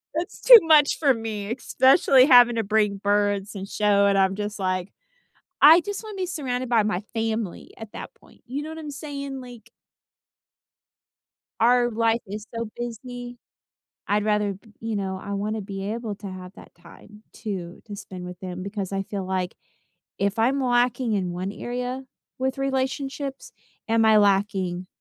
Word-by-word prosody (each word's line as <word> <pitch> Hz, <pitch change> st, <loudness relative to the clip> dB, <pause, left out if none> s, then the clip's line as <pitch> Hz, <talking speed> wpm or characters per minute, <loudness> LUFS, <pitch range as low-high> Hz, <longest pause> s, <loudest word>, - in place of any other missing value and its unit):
that's 335 Hz, +3 st, -4 dB
too -, -, +11 dB
much 305 Hz, -3 st, +5 dB
for 280 Hz, -4 st, +4 dB
me, 220 Hz, -2 st, -5 dB
especially 260 Hz, +1 st, +4 dB
having 245 Hz, -3 st, +7 dB
to 225 Hz, -, 0 dB
bring 210 Hz, -1 st, +1 dB
birds 205 Hz, 0 st, 0 dB
and 195 Hz, 0 st, -6 dB
show 200 Hz, -1 st, +2 dB
and 200 Hz, 0 st, +2 dB
I'm 190 Hz, 0 st, +2 dB
just, 210 Hz, 0 st, -5 dB
like 185 Hz, 0 st, -2 dB, 0.7 s
I 320 Hz, +4 st, +9 dB
just 405 Hz, +5 st, -5 dB
wanna 430 Hz, -2 st, -8 dB
be 375 Hz, -, -1 dB
surrounded 255 Hz, -6 st, -3 dB
by 230 Hz, -2 st, +4 dB
my 205 Hz, -3 st, -1 dB
family 225 Hz, -4 st, -3 dB
at 220 Hz, -2 st, -10 dB
that -, -, -8 dB
point, 460 Hz, -, -22 dB
you 280 Hz, +4 st, -4 dB
know 310 Hz, -, -7 dB
what 320 Hz, -, -7 dB
I'm 300 Hz, -2 st, -7 dB
saying? 280 Hz, -1 st, -6 dB
Like 245 Hz, -2 st, -13 dB, 1.9 s
our 240 Hz, +1 st, +4 dB
life 230 Hz, 0 st, +1 dB
is 210 Hz, +2 st, -6 dB
so 230 Hz, -1 st, -4 dB
busy, 245 Hz, +1 st, -7 dB, 0.7 s
I'd 205 Hz, +1 st, +1 dB
rather 210 Hz, -1 st, +1 dB
b 210 Hz, +3 st, -18 dB
you 225 Hz, -1 st, -3 dB
know, 190 Hz, -1 st, -3 dB
I 200 Hz, -, -6 dB
wanna 210 Hz, +2 st, -2 dB
be 195 Hz, +1 st, -5 dB
able 225 Hz, -2 st, -4 dB
to 200 Hz, -, -8 dB
have 185 Hz, 0 st, -9 dB
that -, -, -15 dB
time 210 Hz, +5 st, -16 dB
to 185 Hz, -5 st, -6 dB
to 205 Hz, -2 st, -7 dB
spend 185 Hz, -2 st, -9 dB
with 180 Hz, 0 st, -9 dB
them 185 Hz, -1 st, -6 dB
because 200 Hz, -1 st, -5 dB
I 195 Hz, 0 st, -1 dB
feel 195 Hz, -1 st, -5 dB
like 185 Hz, -1 st, -2 dB, 0.6 s
if 200 Hz, +2 st, -1 dB
I'm 260 Hz, +5 st, +2 dB
lacking 245 Hz, -1 st, +1 dB
in 185 Hz, -3 st, -1 dB
1 185 Hz, +3 st, -4 dB
area 250 Hz, +4 st, -4 dB, 0.3 s
with 265 Hz, +1 st, -2 dB
relationships, 270 Hz, +1 st, -3 dB, 0.4 s
am 225 Hz, 0 st, +3 dB
I 220 Hz, -1 st, +6 dB
lacking 195 Hz, -3 st, +1 dB
220 Hz, 170 wpm, -24 LUFS, 200-255 Hz, 1.9 s, too